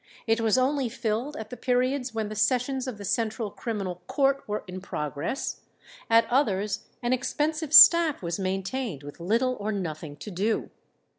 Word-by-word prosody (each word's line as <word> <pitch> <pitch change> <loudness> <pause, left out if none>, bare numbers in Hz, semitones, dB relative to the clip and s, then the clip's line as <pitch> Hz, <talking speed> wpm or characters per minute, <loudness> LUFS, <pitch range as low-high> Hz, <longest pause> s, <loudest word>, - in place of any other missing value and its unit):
It 225 0 +1
was 225 +1 +2
only 265 0 +1
filled 235 +5 -3
at 220 +1 -8
the - - -5
periods 255 +1 0
when 220 -1 -3
the 215 - -6
sessions 255 +5 0
of 250 -5 -5
the 200 - -8
Central 220 +1 -1
Criminal 195 -7 -4
Court 275 -1 +1
were 210 0 -3
in 185 +1 -7
progress; 150 - -4 0.5
at 230 0 +5
others 210 -5 0 0.2
an 240 +1 +1
expensive 305 +4 -1
staff 325 - +8
was 170 +2 -3
maintained 190 - -3
with 145 +3 -10
little 230 +9 +1
or 210 +1 -2
nothing 160 -6 -5
to 205 +8 -9
do. 205 +5 -1
225 Hz, 165 wpm, -26 LUFS, 195-255 Hz, 0.5 s, staff